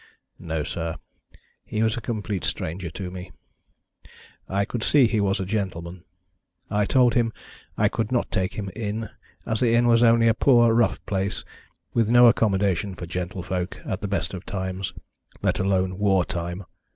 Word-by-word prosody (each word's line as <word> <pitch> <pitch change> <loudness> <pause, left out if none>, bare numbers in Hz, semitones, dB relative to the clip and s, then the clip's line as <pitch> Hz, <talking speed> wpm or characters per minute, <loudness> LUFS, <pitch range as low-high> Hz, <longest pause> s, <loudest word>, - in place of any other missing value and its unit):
"No, 80 -3 -3
sir. 80 +1 -4 0.7
He 110 +1 -2
was 110 0 +1
a 120 - -4
complete 105 -4 -3
stranger 85 +2 -3
to 90 +3 -6
me. 90 0 -8 1.2
I 100 +1 +1
could 120 - -4
see 140 +2 +5
he 110 -2 +1
was 100 0 +1
a 95 - -2
gentleman. 90 -3 -4 0.7
I 105 0 +2
told 125 -1 +4
him 115 -1 +2 0.5
I 105 - +4
could 110 +1 -2
not 125 - 0
take 95 -2 -1
him 100 -2 -4
in, 110 0 -4 0.3
as 110 -1 -1
the 115 -2 +3
inn 120 +1 +4
was 115 -1 +4
only 115 -1 +5
a 115 - +5
poor 120 -1 +4
rough 115 0 +1
place, 100 0 -2 0.5
with 115 -2 +2
no 120 +1 +7
accommodation 100 -4 +2
for 90 - -7
gentlefolk 90 +1 -4
at 95 - -3
the 105 - -2
best 100 0 -2
of 90 -1 -6
times, 95 -1 -4 0.5
let - - +1
alone 95 0 0
war 95 -3 +3
time. 90 +1 -4
100 Hz, 170 wpm, -24 LUFS, 95-115 Hz, 1.2 s, no